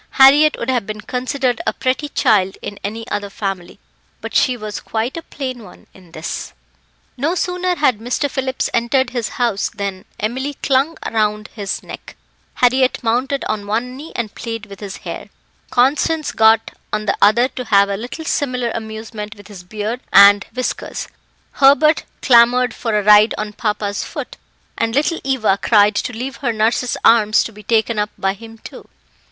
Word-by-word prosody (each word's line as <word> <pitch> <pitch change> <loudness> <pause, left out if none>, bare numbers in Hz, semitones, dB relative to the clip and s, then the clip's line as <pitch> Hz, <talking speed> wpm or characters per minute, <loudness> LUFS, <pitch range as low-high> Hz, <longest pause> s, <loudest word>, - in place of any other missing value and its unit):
Harriett 290 +3 +7
would 235 - -4
have 240 -6 -1
been 215 0 -5
considered 255 0 -2
a - - +1
pretty 260 +3 -1
child 195 -7 +2
in 205 - -6
any 225 +3 -5
other 205 -1 -3
family, 195 -3 -5 0.4
but - - -7
she 255 -2 +2
was 215 -2 -6
quite 225 +3 -3
a 330 - -5
plain 255 -6 -6
one - - -15
in 180 -3 -18
this. 160 +1 -6 0.6
No 305 +8 0
sooner 360 0 -1
had 265 -9 +2
Mr. 245 +5 -1
Phillips 265 -1 -2
entered 245 +2 +1
his 240 -3 -2
house 235 -5 0
than 200 -2 -5
Emily 260 +7 -3
clung 275 +4 +1
round 210 -1 0
his 200 -3 -5
neck; - - -10 0.4
Harriett 255 +1 +2
mounted 255 +4 0
on 210 -2 -3
one 235 +4 -2
knee 300 +5 -9
and 225 -4 -3
played 225 -2 -6
with 200 -2 -12
his 200 -2 -7
hair; - - -6 0.4
Constance 295 +5 +1
got 220 0 +4 0.2
on 215 0 -2
the - - +1
other 235 +5 +5
to 255 -1 -7
have 200 -2 +4
a 200 - -2
little 245 +10 -7
similar 250 -7 -1
amusement 220 -1 -6
with 205 -1 -15
his 200 -4 -10
beard 215 +5 -4
and 200 0 +7
whiskers; 255 0 -4 0.5
Hubert 285 +3 +5 0.2
clamoured 245 -1 +5
for 225 -3 -1
a 210 - 0
ride 210 +1 +6
on 210 0 -4
papa's 210 -2 -2
foot; - - -7 0.4
and 230 +1 0
little 305 +4 +1
Eva 230 -7 +1
cried 210 -2 +4
to 225 - -2
leave 245 +2 -5
her 245 -4 -1
nurse's 230 +3 0
arms 215 -2 +5
to - - -6
be 210 - -12
taken 225 0 +1
up 210 0 0
by 195 0 0
him 225 +2 -12
too. - - -12
230 Hz, 175 wpm, -18 LUFS, 210-260 Hz, 0.6 s, Harriett